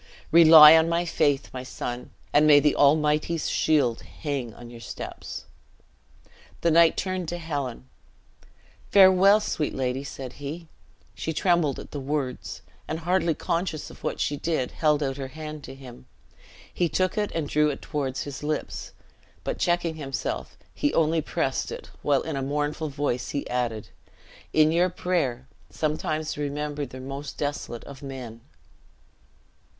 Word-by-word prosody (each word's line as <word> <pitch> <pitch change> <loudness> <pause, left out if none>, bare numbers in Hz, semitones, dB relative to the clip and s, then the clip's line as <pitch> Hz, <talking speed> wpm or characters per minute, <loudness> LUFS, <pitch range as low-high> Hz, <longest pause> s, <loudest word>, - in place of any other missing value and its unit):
"Rely 160 -1 +10
on 160 +1 +4
my 170 +1 +1
faith, 145 -5 +1
my 130 - -4
son; 125 -1 -6 0.2
and 150 +1 +5
may 145 -1 +8
the 150 0 +2
Almighty's 150 +2 +2
shield 140 -7 +2
hang 140 -6 -5
on 120 0 -11
your 120 - -10
steps!" 105 - -7 1.2
The 170 - +3
knight 165 0 +5
turned 185 -2 -2
to 175 - -3
Helen. 140 -7 -4 1.0
"Farewell, 195 +1 +7
sweet 155 -7 -2
lady!" 130 0 -1
said 130 -2 -7
he. 160 +4 -6 0.4
She 160 - -4
trembled 170 -5 +2
at - - -10
the 145 - -4
words, 135 -2 -4 0.2
and, 160 +1 -4
hardly 170 -1 +1
conscious 170 -2 -2
of - - -16
what - - -2
she 145 - 0
did, 155 -5 -1
held 150 -2 +1
out 135 -1 -2
her 135 -1 -4
hand 155 +1 -8
to - - -9
him. 130 -3 -13 0.7
He 175 -2 +1
took 185 +4 0
it, 210 -1 -1
and 160 -3 -1
drew 150 +1 +2
it 140 - -5
toward 135 -4 -3
his 140 -2 -5
lips, 150 0 -4 0.5
but - - -3
checking 175 -2 0
himself, 135 -3 -4 0.2
he 290 - 0
only 160 0 +3
pressed - - -2
it, - - -8
while 140 -2 +2
in 160 -2 -4
a 135 - -2
mournful 150 +3 -2
voice 135 -3 -2
he 140 - -3
added, 120 -4 -2 0.6
"in 155 0 +4
your 175 +2 +3
prayer, 150 -9 -1 0.2
sometimes 155 0 -2
remember 145 0 -3
the 130 - -10
most 135 +2 -7
desolate 145 -5 -4
of 140 -1 -11
men!" 125 -5 -8
150 Hz, 155 wpm, -26 LUFS, 135-165 Hz, 1.2 s, Rely